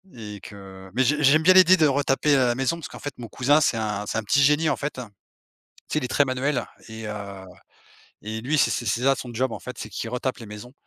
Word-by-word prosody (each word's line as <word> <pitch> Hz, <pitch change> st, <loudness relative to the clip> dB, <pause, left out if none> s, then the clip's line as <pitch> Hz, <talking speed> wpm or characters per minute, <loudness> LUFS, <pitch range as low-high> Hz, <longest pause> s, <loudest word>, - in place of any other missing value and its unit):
et 105 Hz, -3 st, -8 dB
que 95 Hz, -2 st, -12 dB
mais 130 Hz, -, +3 dB
j'ai 150 Hz, +3 st, +1 dB
j'aime 150 Hz, +3 st, +5 dB
bien 185 Hz, +3 st, +7 dB
l'idée 185 Hz, 0 st, +7 dB
de 155 Hz, -, +4 dB
retaper, 145 Hz, +1 st, +2 dB
heu, -, -, +4 dB
la 120 Hz, -, +1 dB
maison 135 Hz, +5 st, -1 dB
parce 165 Hz, -, -7 dB
qu'en -, -, -11 dB
fait 145 Hz, -, -6 dB
mon 120 Hz, -, -8 dB
cousin 135 Hz, +6 st, +2 dB
c'est 125 Hz, -, +2 dB
un 105 Hz, -2 st, -3 dB
c'est -, -, -2 dB
un 110 Hz, -, -2 dB
petit 120 Hz, +7 st, +2 dB
génie, 150 Hz, +3 st, +3 dB
en -, -, 0 dB
fait. 145 Hz, +1 st, -4 dB
Tu 130 Hz, -, -6 dB, 0.9 s
sais -, -, +2 dB
il 155 Hz, -, -4 dB
est -, -, -2 dB
très 145 Hz, -, +3 dB
manuel 130 Hz, 0 st, -1 dB, 0.2 s
et 110 Hz, 0 st, -8 dB
heu 100 Hz, -2 st, -7 dB, 0.8 s
et 110 Hz, +1 st, -5 dB
lui 145 Hz, +6 st, 0 dB
c'est -, -, +3 dB
c'est 120 Hz, -, -2 dB
c'est 115 Hz, +3 st, 0 dB
ça 135 Hz, +1 st, +4 dB
son 125 Hz, -1 st, -7 dB
job, 130 Hz, +2 st, -1 dB
en -, -, -6 dB
fait. 125 Hz, -1 st, -9 dB
C'est -, -, -7 dB
qu'il 115 Hz, -, -5 dB
retape 125 Hz, +2 st, -3 dB
les 115 Hz, -, -9 dB
maisons, 105 Hz, +4 st, -10 dB
125 Hz, 265 wpm, -24 LUFS, 110-145 Hz, 0.9 s, bien